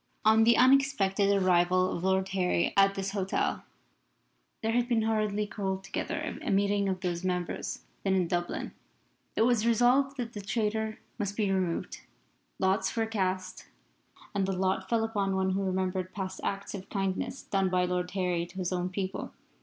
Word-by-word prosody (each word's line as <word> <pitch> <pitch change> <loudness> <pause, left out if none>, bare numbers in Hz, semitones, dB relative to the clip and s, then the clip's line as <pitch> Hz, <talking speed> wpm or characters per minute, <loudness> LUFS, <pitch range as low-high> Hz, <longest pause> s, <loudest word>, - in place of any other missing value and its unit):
On 220 +1 +6
the 235 0 +5
unexpected 250 -7 +4
arrival 185 -1 +3
of 170 - -5
Lord 190 0 +1
Harry 180 -2 +1
at 195 0 +5
this 195 0 -2
hotel, 195 -2 -1 1.0
there 225 - +1
had 240 +1 +1
been 230 -2 +2
hurriedly 215 -1 0
called 190 -2 -3
together - - -4
a 310 - -4
meeting 200 0 +2
of 185 -1 -2
those 175 -2 -2
members 180 -2 -3 0.2
then 195 -1 +1
in 180 -2 +2
Dublin. 175 0 -2 0.6
It - - +3
was 235 -1 +3
resolved 250 +4 +3
that 240 -2 -4
the 205 - -5
traitor 220 +1 -1 0.2
must 205 -1 -2
be 205 -3 +1
removed. 185 -3 -1 0.6
Lots 190 +2 +1
were 225 -1 +1
cast, 185 -4 -2 0.7
and 195 -1 0
the 195 - 0
lot 190 0 -1
fell 230 -1 +2
upon 200 -4 0
one 190 0 +1
who 195 +1 0
remembered 185 -1 -2
past 190 -2 -4
acts 200 0 -3
of 195 -1 -7
kindness 195 +6 -2
done 195 -1 0
by 180 0 +2
Lord 180 0 -1
Harry 180 -2 -1
to 175 +2 -14
his 185 -1 -1
own 180 0 -1
people. 190 +1 -4
195 Hz, 170 wpm, -29 LUFS, 185-215 Hz, 1.0 s, On